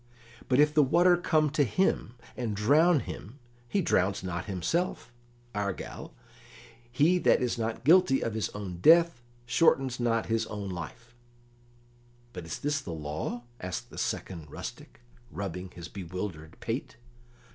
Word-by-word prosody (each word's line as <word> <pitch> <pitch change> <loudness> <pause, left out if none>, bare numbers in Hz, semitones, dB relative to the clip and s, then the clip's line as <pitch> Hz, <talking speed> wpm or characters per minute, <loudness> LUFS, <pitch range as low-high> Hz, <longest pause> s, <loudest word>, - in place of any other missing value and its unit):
But 130 +1 +3
if 150 0 +5
the 155 - +5
water 175 +6 +5
come 155 -4 +2
to 150 -1 +3
him 135 - 0 0.2
and 115 -4 -3
drown 150 - +4
him, 115 +8 -8 0.3
he 200 - +1
drowns 95 - +1
not 90 -1 -3
himself; 120 - -2 0.4
argal, 100 -2 -4 0.8
he 165 +8 +3
that - - +4
is 125 -1 -1
not 115 0 -3
guilty 165 -2 +5
of 115 - -2
his 110 -1 -1
own 100 -4 -6
death 165 - +5 0.2
shortens 130 -1 +2
not 115 -2 +1
his 115 0 0
own 100 -2 -5
life." 95 +7 -8 1.2
"But 90 -3 -7
is 85 - -4
this 145 -3 -2
law?" 80 +8 -4 0.2
asked 90 0 -5
the - - -11
second 85 -5 -4
rustic, 110 - -9 0.3
rubbing 95 -3 -5
his 85 -1 -9
bewildered 90 -3 -6
pate. 120 +5 -4
115 Hz, 140 wpm, -29 LUFS, 95-150 Hz, 1.2 s, if